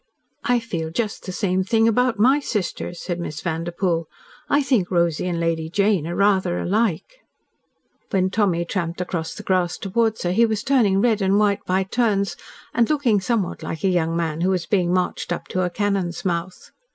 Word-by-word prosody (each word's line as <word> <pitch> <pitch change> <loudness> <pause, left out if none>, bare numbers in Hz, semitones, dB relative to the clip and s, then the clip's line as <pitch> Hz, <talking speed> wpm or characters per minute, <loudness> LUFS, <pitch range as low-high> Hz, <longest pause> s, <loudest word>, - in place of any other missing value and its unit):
"I 245 0 +2
feel 170 -9 -4
just 210 +5 -3
the - - -3
same 185 -1 0
thing 225 +3 +2
about 245 +1 +2
my 260 +7 +4
sister," 210 - -3
said 175 0 -4
Miss 150 -4 -5
Vanderpoel. 170 0 -1 0.4
"I 285 0 +3
think 235 -10 +1
Rosy 170 -1 +1
and 175 -2 -1
Lady 165 -1 -1
Jane 195 -3 +1
are 175 - -3
rather 190 -3 +2
alike."..... 215 - -1 0.9
When 185 -1 +1
Tommy 185 -5 +1
tramped 170 -1 -3
across 175 -3 -3
the - - -8
grass 180 -2 +1
towards 220 +3 0
her 175 - 0
he 230 +5 +4
was 220 -2 -2
turning 220 -8 +3
red 220 -3 +2
and 195 +1 +3
white 205 -1 +2
by 185 +1 +2
turns, 200 -1 0 0.4
and 235 -1 +2
looking 260 -9 +2
somewhat 215 -3 -1
like 160 - -5
a 195 - +3
young 165 -2 +1
man 165 -1 -2
who 185 - +2
was 180 -3 0
being 180 -3 +1
marched 180 -1 -1
up 175 - -3
to 185 - -1
a 180 - 0
cannon's 195 -2 -2
mouth. 175 0 -3
190 Hz, 190 wpm, -22 LUFS, 175-215 Hz, 0.9 s, my